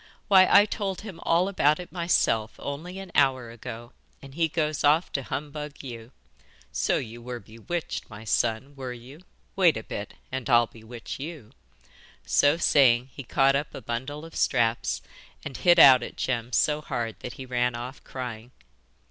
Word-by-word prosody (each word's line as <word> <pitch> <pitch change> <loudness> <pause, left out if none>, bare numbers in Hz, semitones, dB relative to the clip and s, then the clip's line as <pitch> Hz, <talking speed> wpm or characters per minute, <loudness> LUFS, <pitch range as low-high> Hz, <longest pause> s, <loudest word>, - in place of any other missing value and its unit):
Why 190 -2 +7
I 205 +1 +8
told 200 -3 -3
him 200 -6 -9
all 170 +3 +2
about 155 -6 +2
it 180 - -9
myself 140 -11 +1
only 165 +7 -6
an 195 -2 -8
hour 130 -4 +2
ago, 115 0 -9 0.3
and 135 -1 -13
then - - -15
he 165 0 +2
goes 155 -2 -1
off 150 +4 +3
to 140 - -1
humbug 145 +2 -6
you. 120 -2 -8 0.6
So 65 - +1
you 120 0 -6
were 120 0 -6
bewitched, 120 +11 -5
my 110 -1 -10
son 115 +5 -1
were 130 -2 -5
you? 125 +6 -12 0.3
Wait 175 -8 +4
a 110 - -6
bit, 100 - -6 0.2
and 130 0 -4
I'll 120 -1 +6
bewitch 115 +2 -9
you!' 140 -7 -8 0.7
So 145 +3 +3
saying, 130 -6 +4
he - - -7
caught 135 +2 +2
up 145 +2 -2
a - - -5
bundle 130 +7 -5
of 165 - -12
straps, 115 -3 +1 0.4
and 140 -3 -6
hit 175 -1 +4
out 135 -6 +9
at - - -7
Jem 120 -2 -2
so 150 +4 +2
hard 115 -6 -4
that 125 - -7
he 130 - -8
ran 125 -1 0
off 125 +3 -7
crying. 120 -3 -7
135 Hz, 175 wpm, -26 LUFS, 120-155 Hz, 0.7 s, out